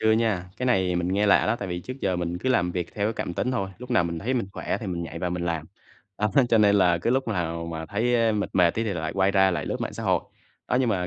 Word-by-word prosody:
chưa 110 - +4
nha, 110 -5 0
cái 125 - -2
này 95 -7 +2
mình 90 0 -1
nghe 100 +3 +1
lạ 100 - +5
đó 110 +2 +1
tại 100 - -5
vì 90 0 -3
trước 130 - -6
giờ 95 -2 0
mình 85 0 -2
cứ 130 - -2
làm 100 -9 +2
việc 90 -1 -4
theo 100 -1 0
cái 110 - 0
cảm 90 - -4
tính 125 - -1
thôi, 100 -7 -1
lúc 125 0 -10
nào 120 -8 +3
mình 85 -1 -3
thấy 120 +9 -1
mình 120 -6 0
khỏe - - -2
thì 110 - -5
mình 90 -2 -3
nhảy 85 0 -6
vào 90 +1 -2
mình 90 0 -2
làm. 80 -2 -2 0.5
Đó, 105 - +2 0.2
cho 115 - +4
nên 105 -1 +5
là 90 -3 +4
cứ 100 - 0
lúc 130 0 +1
nào 85 -5 -2
mà 80 -1 -5
thấy, 115 +6 0
a, 115 -2 +3
mệt 105 -1 -1
mệt 90 -2 +5
tí 115 - -1
thì 105 - -1
lại 80 -2 -3
quay 95 0 +2
ra 95 -1 +4
lại 85 -5 -2
lướt - - -3
mạng - - -3
xã - - -6
hội. - - +2 0.5
Đó, - - +2
nhưng 130 - +1
mà 90 -4 0
95 Hz, 315 wpm, -25 LUFS, 85-110 Hz, 0.5 s, lạ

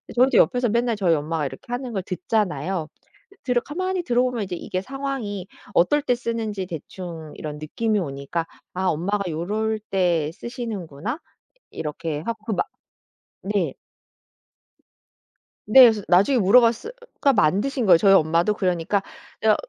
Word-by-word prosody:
저희도 255 +2 +4
옆에서 245 -1 +3
맨날 235 +1 +1
저희 185 -5 +2
엄마가 155 0 -1
이렇게 - - -7
하는 245 -1 -3
걸 195 - -1
듣잖아요. 180 -3 -1 0.6
들어 245 -2 +1
가만히 370 +6 -2
들어보면 245 -4 +1
이제 185 - -5
이게 185 +1 -4
상황이 260 -7 -4 0.3
어떨 290 +13 +4
때 250 -4 +1
쓰는지 225 -5 -3
대충 165 -1 -8
이런 150 -1 -6
느낌이 215 +7 -1
오니까 140 +2 -3 0.3
'아 185 +1 -1
엄마가 185 +4 0
요럴 210 +7 -1
때 170 -5 +1
쓰시는구나.' 225 - -5 0.5
이렇게 155 0 -4
하고 225 +4 -5
그 220 - -1
막 - - 0 0.8
네. 190 -7 0 1.9
네. 260 +5 +8
그래서 220 -4 +7
나중에 200 +10 +4
물어봤으 230 - +4
어 - - -7 0.3
그냥 275 -3 +4
만드신 210 - +2
거예요. 175 -3 +7
저희 195 +2 +5
엄마도 170 +4 +3
그러니까 185 0 0 0.4
저 215 -1 +5
200 Hz, 320 characters per minute, -23 LUFS, 170-235 Hz, 1.9 s, 네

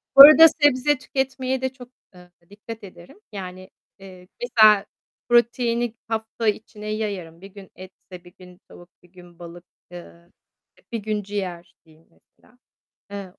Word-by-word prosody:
Bu 275 - +11
arada 305 +3 +10
sebze 290 -2 +1
tüketmeye 265 0 -3
de 260 - -1
çok, 250 -2 -14 0.2
eee, 180 -1 -18 0.2
dikkat 215 +2 -11
ederim. 180 - -15
Yani, 185 -2 -9 0.3
eee, 185 -2 -15
mesela 215 -4 +4 0.4
proteini 240 -1 +1
hafta 225 0 -4
içine 210 0 -4
yayarım. 200 -6 -5
1 195 - -11
gün 195 -1 -15
etse, 185 -1 -14
1 175 0 -18
gün 180 -1 -16
tavuk, 175 0 -16
1 180 - -23
gün 175 -2 -18
balık, 175 0 -12 0.3
ııı, 175 0 -14 0.5
işte, - - -29
1 235 - -3
gün 210 -1 -3
ciğer 185 -4 -7
diye 160 0 -24
mesela. 245 - -30 0.5
Eee 200 -2 -9
205 Hz, 150 wpm, -22 LUFS, 180-240 Hz, 0.5 s, Bu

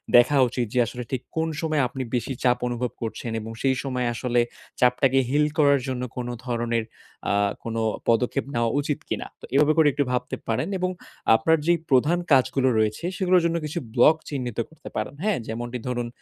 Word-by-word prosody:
দেখা 125 +4 +6
উচিত। 120 0 -2
যে, 125 - +2
আসলে 125 0 -6
ঠিক 130 -2 -1 0.2
কোন 160 - +1
সময় 155 -3 +1
আপনি 130 +1 -5
বেশি 125 +2 -1
চাপ 125 -1 +4
অনুভব 120 0 -2
করছেন 115 +1 -4
এবং 110 +1 -7
সেই 135 -1 +2
সময় 125 -3 -1
আসলে 120 +1 0 0.4
চাপটাকে 125 +2 +4
হিল 150 +2 +3
করার 140 -2 +5
জন্য 130 -1 -2 0.2
কোন 125 -1 -3 0.2
ধরনের 115 -2 -1 0.5
আ - - +2 0.3
কোন 115 -1 -4 0.3
পদক্ষেপ 125 +4 +2
নেওয়া 120 -1 +1
উচিত 145 0 -1
কিনা। - - -3
তো - - -8
এভাবে 150 +2 +5
করে 160 -2 +6
একটু 145 - +1
ভাবতে 125 0 -1
পারেন 115 +7 0
এবং 185 - 0 0.5
আপনার 160 +9 +3
যেই 170 -1 +3
প্রধান 145 +6 +4
কাজগুলো 130 0 +4
রয়েছে 110 +8 0
সেগুলোর 185 -2 +4
জন্য 170 0 +1
কিছু 155 +3 -3
ব্লক 155 +6 +6
চিহ্নিত 125 -6 -4
করতে 160 - -12
পারেন। - - -2
হ্যাঁ? 210 -2 +2
যেমনটি 120 +2 -4
ধরুন 120 -1 -2
125 Hz, 185 wpm, -25 LUFS, 120-145 Hz, 0.5 s, দেখা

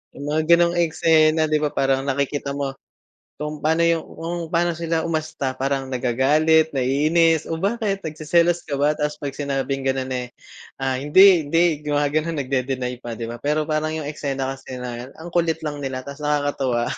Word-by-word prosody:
Yung 140 - -7
mga 155 +1 +1
ganong 170 0 +3
eksena, 160 -1 +3
di 155 - +3
ba, 150 -1 -1
parang 135 0 +1
nakikita 140 +1 -1
mo, 140 -1 -2 0.7
kung 150 0 -5
paano 160 +2 +2
yung 170 -1 +2
kung 170 +2 -5
pano 170 +1 +2
sila 165 -1 -1
umasta. 155 -4 -2
Parang 135 0 -1
nagagalit, 150 +6 +3
naiinis, 155 +5 +2
"O 165 - -1
bakit 200 -1 -1
nagseselos 170 +3 +1
ka 140 - -1
ba?" 145 +1 +3
Tapos 150 0 -2
'pag 140 -2 -4
sinabing 135 -1 -2
ganun 130 -1 -1
eh, 125 -1 -3 0.5
ah, 135 -1 -1
"Hindi, 175 +4 +6
hindi" 165 -1 +2
gumaganun, 150 +2 0
nagde-deny 130 -2 -2
pa, 115 -2 -6
di 115 - -4
ba? 120 0 -7
Pero 150 +1 +1
parang 155 0 -1
yung 155 - -5
eksena 140 -3 -3
kasi 130 -1 -9
na 125 0 -6
ang 170 +2 -9
kulit 165 -2 +2
lang 145 -1 -4
nila 130 -1 -4
tapos 140 +1 -8
nakakatuwa. 145 -5 0
150 Hz, 175 wpm, -22 LUFS, 135-160 Hz, 0.7 s, Hindi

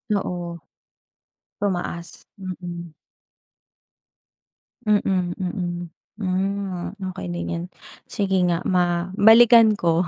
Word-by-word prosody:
Oo. 175 -3 -3 1.0
Tumaas, 175 -3 -3
mm. 175 -3 -7 1.9
Mm, 190 -4 +1
mm. 175 -2 -3 0.3
Hmm, 195 -1 -2 0.2
okey 90 - -6
din 85 0 -3
yan. 85 0 -3 0.5
Sige 190 -2 +1
nga 170 -1 -1
ma 175 0 +1
balikan 225 +1 +7
ko, 170 -2 +2
180 Hz, 85 wpm, -23 LUFS, 175-200 Hz, 1.9 s, balikan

